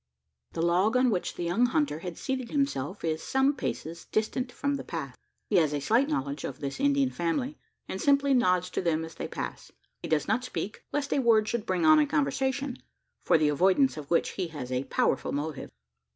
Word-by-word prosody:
The 165 Hz, -, -1 dB
log 185 Hz, +8 st, +3 dB
on 255 Hz, -1 st, +3 dB
which 185 Hz, -4 st, -2 dB
the -, -, -4 dB
young 200 Hz, +9 st, +2 dB
hunter 285 Hz, -, 0 dB
had 175 Hz, -1 st, -6 dB
seated 260 Hz, -3 st, -3 dB
himself 205 Hz, -, -1 dB
is 160 Hz, -1 st, -1 dB
some 265 Hz, +2 st, +2 dB
paces 170 Hz, -, -5 dB
distant 250 Hz, +4 st, -1 dB
from 285 Hz, +3 st, -1 dB
the 280 Hz, -, -3 dB
path. 140 Hz, -7 st, -5 dB, 0.3 s
He 205 Hz, -, +2 dB
has 155 Hz, -4 st, +3 dB
a 145 Hz, -, 0 dB
slight 235 Hz, -, +2 dB
knowledge 140 Hz, -, -2 dB
of 130 Hz, -, -5 dB
this 140 Hz, -2 st, -4 dB
Indian 280 Hz, -1 st, +2 dB
family, 250 Hz, -, -2 dB, 0.3 s
and 190 Hz, -, -4 dB
simply 280 Hz, -1 st, +3 dB
nods 180 Hz, -7 st, +2 dB
to -, -, -1 dB
them 165 Hz, -2 st, 0 dB
as 160 Hz, -, -10 dB
they -, -, -5 dB
pass. -, -, -6 dB, 0.3 s
He -, -, -5 dB
does 155 Hz, -2 st, +1 dB
not 250 Hz, -, +1 dB
speak, 215 Hz, -4 st, -5 dB
lest 285 Hz, -1 st, -1 dB
a -, -, +2 dB
word 225 Hz, -4 st, +4 dB
should 235 Hz, -2 st, -2 dB
bring 180 Hz, -3 st, +1 dB
on 155 Hz, 0 st, +7 dB
a 150 Hz, -, +3 dB
conversation 255 Hz, -, -1 dB, 0.4 s
for -, -, +4 dB
the 155 Hz, -1 st, +3 dB
avoidance 190 Hz, -, +3 dB
of 150 Hz, -2 st, -8 dB
which 170 Hz, -, +2 dB
he 185 Hz, -3 st, -3 dB
has 145 Hz, -6 st, -7 dB
a 130 Hz, +1 st, -1 dB
powerful -, -, 0 dB
motive. 145 Hz, 0 st, -4 dB
185 Hz, 210 wpm, -28 LUFS, 155-260 Hz, 0.4 s, on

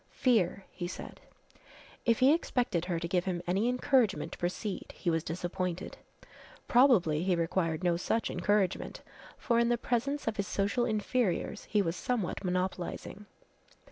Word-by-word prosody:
"Fear," 200 Hz, -7 st, +2 dB
he 175 Hz, -, -5 dB
said. 180 Hz, -, -8 dB, 0.9 s
If 230 Hz, +1 st, +3 dB
he 270 Hz, +3 st, +7 dB
expected 240 Hz, -, 0 dB
her 175 Hz, -2 st, -1 dB
to 170 Hz, -, -3 dB
give 180 Hz, 0 st, 0 dB
him 180 Hz, -2 st, -2 dB
any 195 Hz, +7 st, +1 dB
encouragement 250 Hz, -4 st, +2 dB
to -, -, -8 dB
proceed 185 Hz, +3 st, -3 dB
he 175 Hz, -, 0 dB
was 165 Hz, -1 st, 0 dB
disappointed. 175 Hz, +1 st, -4 dB, 0.7 s
Probably 220 Hz, -, +4 dB
he 180 Hz, 0 st, +2 dB
required 165 Hz, 0 st, 0 dB
no 175 Hz, -1 st, +2 dB
such 225 Hz, +6 st, -1 dB
encouragement, 190 Hz, +1 st, 0 dB, 0.3 s
for 235 Hz, -3 st, +1 dB
in 235 Hz, 0 st, +3 dB
the 240 Hz, -, +2 dB
presence 260 Hz, +5 st, -1 dB
of 225 Hz, -, -1 dB
his 200 Hz, 0 st, -1 dB
social 205 Hz, +5 st, 0 dB
inferiors 215 Hz, -2 st, -1 dB
he 210 Hz, -2 st, +2 dB
was 165 Hz, -1 st, -1 dB
somewhat 215 Hz, -3 st, -2 dB
monopolizing. 185 Hz, +2 st, -3 dB
195 Hz, 150 wpm, -31 LUFS, 175-235 Hz, 0.9 s, he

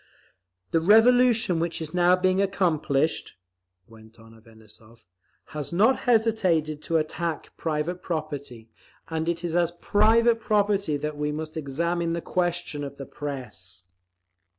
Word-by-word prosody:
"The 165 Hz, -, +2 dB
revolution 225 Hz, -1 st, +4 dB
which 170 Hz, 0 st, -2 dB
is 155 Hz, -1 st, -6 dB
now 180 Hz, 0 st, +4 dB
being 185 Hz, +1 st, +1 dB
accomplished," 160 Hz, -6 st, 0 dB, 0.5 s
went 110 Hz, 0 st, -17 dB
on 115 Hz, 0 st, -16 dB
Avanessov, 110 Hz, 0 st, -15 dB, 0.5 s
"has 150 Hz, -2 st, -4 dB
not 215 Hz, +9 st, +3 dB
hesitated 185 Hz, -10 st, +2 dB
to 165 Hz, +1 st, 0 dB
attack 160 Hz, +1 st, -3 dB
private 160 Hz, +3 st, -3 dB
property; 140 Hz, -8 st, -5 dB, 0.4 s
and 160 Hz, 0 st, -2 dB
it 170 Hz, 0 st, -3 dB
is 170 Hz, -1 st, -2 dB
as 175 Hz, -1 st, +3 dB
private 225 Hz, +5 st, +3 dB
property 205 Hz, -7 st, +1 dB
that 150 Hz, +1 st, -4 dB
we 150 Hz, 0 st, -1 dB
must 155 Hz, +1 st, -5 dB
examine 165 Hz, +3 st, -1 dB
the 170 Hz, -, -2 dB
question 175 Hz, -5 st, -2 dB
of 140 Hz, 0 st, -7 dB
the 135 Hz, -, -7 dB
Press…." 110 Hz, -12 st, -7 dB
165 Hz, 130 wpm, -25 LUFS, 145-185 Hz, 0.5 s, revolution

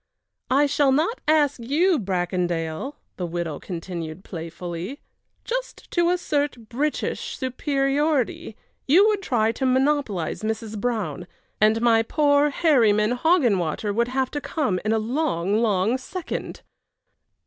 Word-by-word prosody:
"I 280 Hz, +3 st, +4 dB
shall 285 Hz, -1 st, +2 dB
not 320 Hz, -, +1 dB
ask 295 Hz, -3 st, +3 dB
you, 310 Hz, +9 st, +2 dB
Bracondale," 175 Hz, -, -2 dB, 0.2 s
the 180 Hz, -, -2 dB
widow 170 Hz, -3 st, -4 dB
continued, 170 Hz, -1 st, -6 dB
playfully. 175 Hz, -, -6 dB, 0.5 s
"Just -, -, -5 dB
to 345 Hz, -1 st, +2 dB
assert 290 Hz, -9 st, -1 dB
British 290 Hz, +5 st, -2 dB
superiority, 275 Hz, -1 st, 0 dB, 0.3 s
you 365 Hz, +10 st, +6 dB
would 420 Hz, -2 st, 0 dB
try 225 Hz, -, +1 dB
to 250 Hz, -, -5 dB
monopolize 260 Hz, -, +1 dB
Mrs. 220 Hz, 0 st, -3 dB
Brown, 215 Hz, -7 st, -2 dB, 0.3 s
and 220 Hz, +2 st, +4 dB
my 230 Hz, -2 st, +5 dB
poor 290 Hz, +4 st, +3 dB
Herryman 230 Hz, -9 st, +3 dB
Hoggenwater 225 Hz, -, +1 dB
would 235 Hz, +3 st, +1 dB
have 260 Hz, +1 st, -1 dB
to 290 Hz, -, -3 dB
come 265 Hz, -, -1 dB
in 215 Hz, -, 0 dB
a 225 Hz, -, +3 dB
long, 220 Hz, -, 0 dB
long 215 Hz, +2 st, +1 dB
second!" 360 Hz, +7 st, -6 dB
240 Hz, 125 wpm, -24 LUFS, 195-290 Hz, 0.5 s, you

